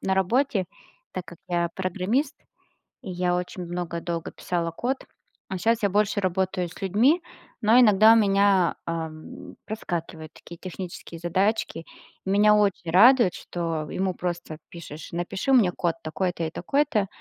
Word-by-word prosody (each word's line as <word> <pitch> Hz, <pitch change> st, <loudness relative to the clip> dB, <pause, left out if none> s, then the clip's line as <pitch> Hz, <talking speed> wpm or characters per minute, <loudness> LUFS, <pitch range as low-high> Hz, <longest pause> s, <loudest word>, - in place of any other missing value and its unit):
на 190 Hz, 0 st, +1 dB
работе, 195 Hz, 0 st, +1 dB, 0.5 s
так 180 Hz, -, -5 dB
как 170 Hz, -1 st, -12 dB
я 175 Hz, -1 st, 0 dB
программист, 200 Hz, -, -1 dB, 0.7 s
и 195 Hz, -, -7 dB
я 180 Hz, 0 st, 0 dB
очень 180 Hz, 0 st, -4 dB
много, 175 Hz, -1 st, -4 dB
долго 170 Hz, -1 st, -4 dB
писала 170 Hz, -2 st, -2 dB
код, 250 Hz, +10 st, -3 dB, 0.4 s
а 190 Hz, -, -4 dB
щас 230 Hz, +4 st, +1 dB
я 200 Hz, -, +2 dB
больше 205 Hz, +1 st, +1 dB
работаю 185 Hz, -1 st, -1 dB
с 170 Hz, -, -13 dB
людьми, 235 Hz, -, +3 dB, 0.4 s
но 225 Hz, +2 st, +5 dB
иногда 215 Hz, -2 st, +7 dB
у -, -, +4 dB
меня, 200 Hz, -4 st, +3 dB
эм, 160 Hz, -1 st, -6 dB
проскакивают 170 Hz, -6 st, -5 dB
такие 170 Hz, -, -12 dB
технические 175 Hz, -2 st, -8 dB
задачки. 185 Hz, 0 st, 0 dB, 0.4 s
Меня 205 Hz, +2 st, +4 dB
очень 195 Hz, -5 st, +1 dB
радует, 225 Hz, +2 st, +6 dB
что 165 Hz, -3 st, -4 dB
ему 190 Hz, 0 st, -1 dB
просто 175 Hz, -3 st, -4 dB
пишешь: 160 Hz, -3 st, -10 dB
"Напиши 175 Hz, +9 st, -2 dB
мне 220 Hz, -9 st, +5 dB
код 170 Hz, -1 st, -1 dB
такой-то 170 Hz, +2 st, -2 dB
и 160 Hz, -, -3 dB
такой-то",- 215 Hz, -, 0 dB
185 Hz, 145 wpm, -25 LUFS, 170-210 Hz, 0.7 s, иногда